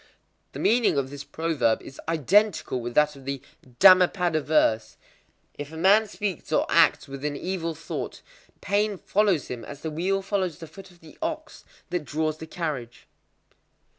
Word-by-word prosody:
The -, -, -7 dB
meaning 225 Hz, -8 st, +3 dB
of 135 Hz, -1 st, -1 dB
this 145 Hz, -1 st, -7 dB
proverb 160 Hz, -8 st, 0 dB
is 135 Hz, -, -11 dB
identical 165 Hz, -, +2 dB
with 120 Hz, 0 st, -6 dB
that 150 Hz, 0 st, +3 dB
of 135 Hz, -1 st, -14 dB
the 140 Hz, 0 st, -3 dB, 0.4 s
Dhammapada 180 Hz, -3 st, +6 dB
verse:—"If 145 Hz, +1 st, -2 dB
a 160 Hz, -, -8 dB
man 205 Hz, +6 st, +4 dB
speaks 200 Hz, -4 st, -5 dB
or -, -, +2 dB
acts -, -, +4 dB
with 140 Hz, 0 st, -8 dB
an 145 Hz, -1 st, -2 dB
evil 170 Hz, -1 st, -3 dB
thought, 160 Hz, -, -6 dB, 0.4 s
pain 205 Hz, 0 st, 0 dB
follows 195 Hz, -6 st, +1 dB
him 120 Hz, -2 st, -6 dB
as 145 Hz, +3 st, -10 dB
the 160 Hz, -, -3 dB
wheel 190 Hz, +5 st, -1 dB
follows 190 Hz, -5 st, -1 dB
the 165 Hz, -, -9 dB
foot 190 Hz, +5 st, -13 dB
of 175 Hz, -1 st, -21 dB
the 160 Hz, -2 st, -16 dB
ox 315 Hz, -1 st, -5 dB, 0.3 s
that 175 Hz, -3 st, -1 dB
draws 155 Hz, +1 st, -2 dB
the 160 Hz, -, -8 dB
carriage." 150 Hz, -9 st, -5 dB
160 Hz, 165 wpm, -25 LUFS, 145-195 Hz, 0.4 s, Dhammapada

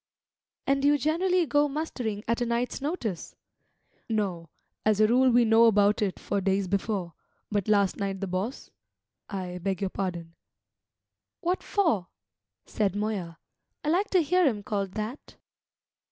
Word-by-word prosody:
"And 275 Hz, 0 st, +2 dB
do 285 Hz, -, +3 dB
you 290 Hz, 0 st, +5 dB
generally 345 Hz, +5 st, +2 dB
go 290 Hz, 0 st, +3 dB
mustering 250 Hz, -8 st, -3 dB
at 230 Hz, +1 st, 0 dB
a -, -, +2 dB
night's 240 Hz, +3 st, -1 dB
notice?" 270 Hz, -, -3 dB, 0.7 s
"No, 190 Hz, -7 st, -2 dB, 0.3 s
as 215 Hz, -1 st, +2 dB
a 215 Hz, -, +6 dB
rule 255 Hz, +4 st, +4 dB
we 240 Hz, -1 st, +5 dB
know 225 Hz, +1 st, +6 dB
about 210 Hz, -1 st, +4 dB
it 195 Hz, -3 st, 0 dB
for 200 Hz, -, -2 dB
days 195 Hz, 0 st, +1 dB
before; 195 Hz, -2 st, -2 dB, 0.4 s
but 205 Hz, -3 st, 0 dB
last 200 Hz, -2 st, +3 dB
night 195 Hz, -2 st, -2 dB
the 195 Hz, -, -2 dB
boss 190 Hz, +7 st, -4 dB, 0.6 s
I 180 Hz, -3 st, -5 dB
beg 190 Hz, 0 st, -2 dB
your 195 Hz, -2 st, -2 dB
pardon 175 Hz, -4 st, -4 dB, 0.5 s
" -, -, -62 dB
"What 360 Hz, 0 st, 0 dB
for?" 320 Hz, -, +1 dB, 0.6 s
said 205 Hz, -3 st, -1 dB
Moya. 205 Hz, -6 st, -3 dB, 0.5 s
"I 300 Hz, -, -1 dB
like 375 Hz, +6 st, +2 dB
to 365 Hz, -3 st, +3 dB
hear 360 Hz, +2 st, +3 dB
him 210 Hz, -6 st, -1 dB
called 200 Hz, -2 st, -2 dB
that." 220 Hz, +6 st, -6 dB
215 Hz, 155 wpm, -27 LUFS, 195-275 Hz, 0.7 s, a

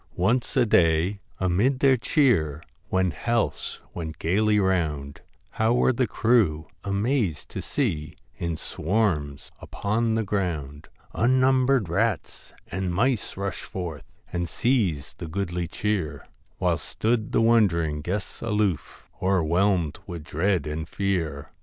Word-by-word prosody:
Once 120 Hz, +9 st, +1 dB
on 125 Hz, -, +6 dB
a -, -, +1 dB
day, 85 Hz, 0 st, +3 dB, 0.2 s
amid 100 Hz, +9 st, +2 dB
their 135 Hz, -2 st, +5 dB
cheer, 85 Hz, -, +2 dB, 0.3 s
When 95 Hz, -1 st, +2 dB
healths 115 Hz, +6 st, -1 dB
went 80 Hz, -2 st, -5 dB
gaily 105 Hz, +5 st, +2 dB
round, 75 Hz, -7 st, -1 dB, 0.3 s
How 110 Hz, +2 st, +2 dB
were 125 Hz, +1 st, +3 dB
the 125 Hz, 0 st, +1 dB
crew 105 Hz, -10 st, +2 dB, 0.2 s
amazed 100 Hz, -, 0 dB
to -, -, -5 dB
see, 85 Hz, -, -2 dB, 0.2 s
In 85 Hz, -2 st, -2 dB
swarms 80 Hz, -8 st, -1 dB
upon 110 Hz, +2 st, -1 dB
the 110 Hz, -, +1 dB
ground, 80 Hz, -8 st, -3 dB, 0.3 s
Unnumbered 130 Hz, -1 st, +3 dB
rats 100 Hz, +2 st, -1 dB
and 95 Hz, 0 st, -3 dB
mice 115 Hz, +4 st, 0 dB
rush 100 Hz, -4 st, -3 dB
forth 85 Hz, -6 st, -6 dB, 0.2 s
And 85 Hz, -1 st, -1 dB
seize 95 Hz, -, 0 dB
the 85 Hz, -, -5 dB
goodly 90 Hz, 0 st, -2 dB
cheer, 100 Hz, -2 st, -2 dB, 0.3 s
While -, -, +1 dB
stood 110 Hz, -1 st, -1 dB
the -, -, +2 dB
wond'ring 90 Hz, -10 st, +3 dB
guests 95 Hz, +6 st, -4 dB
aloof, 105 Hz, -7 st, -1 dB
Overwhelmed 90 Hz, -2 st, +2 dB
with 85 Hz, -3 st, -6 dB
dread 85 Hz, +2 st, 0 dB
and 75 Hz, +1 st, -4 dB
fear. 85 Hz, -8 st, -2 dB
95 Hz, 130 wpm, -25 LUFS, 80-115 Hz, 0.3 s, on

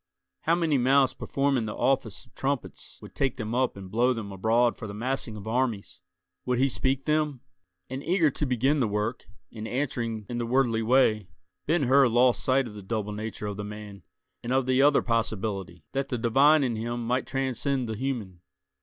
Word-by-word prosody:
How 165 Hz, -, +4 dB
many 160 Hz, -5 st, +1 dB
mouths 135 Hz, +1 st, +4 dB
performing 135 Hz, -5 st, 0 dB
the 105 Hz, -, -5 dB
office 130 Hz, -6 st, 0 dB
of -, -, -27 dB
trumpets 135 Hz, -2 st, -4 dB
would -, -, -11 dB
take 135 Hz, -2 st, -1 dB
them 110 Hz, -1 st, -4 dB
up 125 Hz, -3 st, 0 dB
and 95 Hz, -1 st, -9 dB
blow 120 Hz, +4 st, +3 dB
them 110 Hz, -4 st, -6 dB
abroad 115 Hz, +5 st, +2 dB
for 115 Hz, -, -7 dB
the 100 Hz, -, -7 dB
massing 120 Hz, 0 st, -2 dB
of 105 Hz, +1 st, -9 dB
armies! 115 Hz, -, -2 dB, 0.4 s
Would 125 Hz, -1 st, 0 dB
he 135 Hz, +2 st, +3 dB
speak 135 Hz, +1 st, -1 dB
them? 150 Hz, -4 st, 0 dB, 0.5 s
And 130 Hz, +2 st, -6 dB
eager 170 Hz, -4 st, +2 dB
to 145 Hz, -, -2 dB
begin 130 Hz, +4 st, +2 dB
the 120 Hz, -, +2 dB
work, 105 Hz, +3 st, -2 dB, 0.3 s
and 110 Hz, -1 st, -6 dB
answering 115 Hz, -5 st, -2 dB
in 120 Hz, -1 st, -4 dB
the 120 Hz, -, -2 dB
worldly 120 Hz, -2 st, +2 dB
way, 110 Hz, -4 st, +3 dB, 0.4 s
Ben 160 Hz, 0 st, +2 dB
Hur 135 Hz, +1 st, +5 dB
lost 120 Hz, +1 st, +3 dB
sight 130 Hz, 0 st, +2 dB
of 110 Hz, -, -10 dB
the 105 Hz, -, -9 dB
double 105 Hz, +1 st, -3 dB
nature 105 Hz, 0 st, -5 dB
of 105 Hz, -1 st, -4 dB
the 105 Hz, -, -4 dB
man, 105 Hz, -1 st, -8 dB, 0.4 s
and 120 Hz, -, -4 dB
of 130 Hz, 0 st, +2 dB
the 130 Hz, +1 st, +3 dB
other 145 Hz, 0 st, +5 dB
possibility, 100 Hz, -6 st, -2 dB
that 135 Hz, +1 st, -2 dB
the 125 Hz, -, -1 dB
divine 140 Hz, +6 st, +4 dB
in 120 Hz, -3 st, 0 dB
him 120 Hz, +1 st, -3 dB
might 125 Hz, +2 st, 0 dB
transcend 135 Hz, -1 st, -1 dB
the 110 Hz, -, -3 dB
human. 110 Hz, -8 st, -4 dB
120 Hz, 200 wpm, -27 LUFS, 110-135 Hz, 0.5 s, Hur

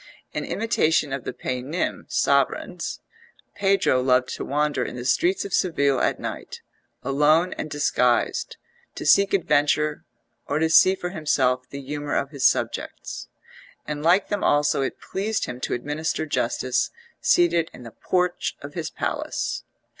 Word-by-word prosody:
In -, -, -3 dB
imitation 160 Hz, -10 st, +1 dB
of 135 Hz, -, -4 dB
the -, -, -2 dB
Paynim 130 Hz, +7 st, -3 dB
sovereigns -, -, 0 dB, 0.5 s
Pedro 195 Hz, -10 st, +2 dB
loved 125 Hz, -1 st, +2 dB
to -, -, -4 dB
wander 145 Hz, -2 st, 0 dB
in -, -, -5 dB
the 125 Hz, 0 st, -6 dB
streets 175 Hz, +11 st, +2 dB
of 200 Hz, -, -6 dB
Seville 140 Hz, -7 st, +2 dB
at -, -, +1 dB
night, -, -, -6 dB, 0.4 s
alone 150 Hz, +6 st, +3 dB
and 155 Hz, -, -5 dB
disguised, 125 Hz, -4 st, +1 dB, 0.4 s
to -, -, -6 dB
seek 200 Hz, 0 st, +5 dB
adventure 150 Hz, -4 st, +2 dB, 0.4 s
or 145 Hz, -, 0 dB
to 160 Hz, +1 st, +1 dB
see 185 Hz, +3 st, +7 dB
for 180 Hz, -1 st, -4 dB
himself 130 Hz, -6 st, 0 dB
the 140 Hz, -, -7 dB
humour 145 Hz, +1 st, -3 dB
of 140 Hz, -, -1 dB
his 140 Hz, -4 st, +4 dB
subjects; -, -, -4 dB, 0.6 s
and 150 Hz, -1 st, -4 dB
like 175 Hz, +5 st, +3 dB
them 205 Hz, -1 st, -1 dB
also 145 Hz, -1 st, +3 dB
it 135 Hz, -, -3 dB
pleased 205 Hz, +3 st, -2 dB
him 125 Hz, -, -6 dB
to -, -, -1 dB
administer 150 Hz, +5 st, -2 dB
justice 130 Hz, -3 st, 0 dB, 0.3 s
seated 170 Hz, -1 st, +3 dB
in 125 Hz, -, -12 dB
the 115 Hz, -, -9 dB
porch 180 Hz, -, -1 dB
of 145 Hz, 0 st, -8 dB
his 170 Hz, -3 st, -4 dB
palace. -, -, -3 dB
150 Hz, 150 wpm, -24 LUFS, 135-175 Hz, 0.6 s, see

